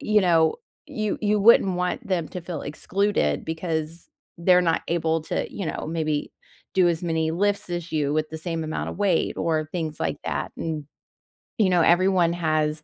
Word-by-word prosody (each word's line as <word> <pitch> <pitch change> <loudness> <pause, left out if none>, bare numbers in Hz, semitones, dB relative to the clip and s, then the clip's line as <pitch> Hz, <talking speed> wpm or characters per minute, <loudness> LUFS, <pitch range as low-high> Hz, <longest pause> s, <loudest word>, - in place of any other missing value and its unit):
you 215 -1 +3
know, 165 -3 +3 0.3
you 215 -2 -2
you 210 -1 +2
wouldn't 195 -4 +6
want 180 0 -2
them 175 -5 -1
to 180 - -6
feel 170 -3 -6
excluded 165 - 0
because 160 0 -4 0.3
they're 180 +1 +5
not 165 -2 +1
able 165 -1 +1
to, - - -3
you 195 - -4
know, - - -4
maybe 155 -2 -1 0.4
do 185 -2 +5
as 170 0 -1
many 160 -1 0
lifts 200 +1 0
as 175 0 -4
you 145 -2 0
with 155 0 0
the 160 - -5
same 165 0 -3
amount 155 - -3
of - - -8
weight 195 -5 +1
or 155 -2 0
things 160 -4 -3
like - - -1
that, - - -3
and, 155 -3 -3 0.7
you 210 -4 +3
know, 180 -2 +4
everyone 175 0 +4
has 155 -2 0
170 Hz, 180 wpm, -24 LUFS, 160-185 Hz, 0.7 s, wouldn't